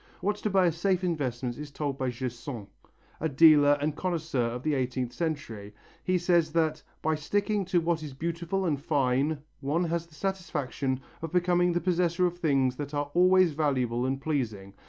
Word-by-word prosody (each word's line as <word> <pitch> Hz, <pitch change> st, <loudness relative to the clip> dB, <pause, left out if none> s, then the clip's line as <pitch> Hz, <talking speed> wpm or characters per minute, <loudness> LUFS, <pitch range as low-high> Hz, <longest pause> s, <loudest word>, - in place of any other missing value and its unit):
What 205 Hz, +1 st, 0 dB
to 210 Hz, -, -2 dB
buy 190 Hz, -2 st, +4 dB
as 170 Hz, -2 st, +1 dB
safe 185 Hz, +1 st, +1 dB
investments 130 Hz, -8 st, -2 dB
is 150 Hz, -1 st, -6 dB
told 140 Hz, -1 st, -4 dB
by 130 Hz, -1 st, 0 dB
Gersaint, 120 Hz, -2 st, -5 dB, 0.5 s
a 160 Hz, -, 0 dB
dealer 145 Hz, 0 st, +6 dB
and 150 Hz, +1 st, -1 dB
connoisseur 160 Hz, -9 st, -1 dB
of 120 Hz, +2 st, -5 dB
the 155 Hz, -, +1 dB
eighteenth 130 Hz, -2 st, -1 dB
century. 115 Hz, -11 st, -4 dB, 0.3 s
He 185 Hz, 0 st, +2 dB
says 175 Hz, -2 st, +2 dB
that 160 Hz, -2 st, +1 dB, 0.2 s
"by 160 Hz, -, +2 dB
sticking 200 Hz, +6 st, 0 dB
to 180 Hz, -1 st, +2 dB
what 165 Hz, -1 st, 0 dB
is 145 Hz, -4 st, -7 dB
beautiful 170 Hz, +5 st, -2 dB
and 145 Hz, -5 st, 0 dB
fine 140 Hz, 0 st, +1 dB, 0.2 s
one 150 Hz, +5 st, 0 dB
has 170 Hz, 0 st, -2 dB
the 160 Hz, -, -19 dB
satisfaction 150 Hz, -8 st, -2 dB, 0.2 s
of 165 Hz, -1 st, -5 dB
becoming 175 Hz, 0 st, +2 dB
the 175 Hz, -, 0 dB
possessor 175 Hz, 0 st, +1 dB
of 175 Hz, 0 st, -2 dB
things 135 Hz, -6 st, +2 dB
that 145 Hz, 0 st, -5 dB
are 145 Hz, 0 st, -2 dB
always 185 Hz, 0 st, +5 dB
valuable 130 Hz, -5 st, 0 dB
and 135 Hz, +1 st, -1 dB
pleasing. 115 Hz, -10 st, -3 dB
155 Hz, 180 wpm, -28 LUFS, 135-175 Hz, 0.5 s, dealer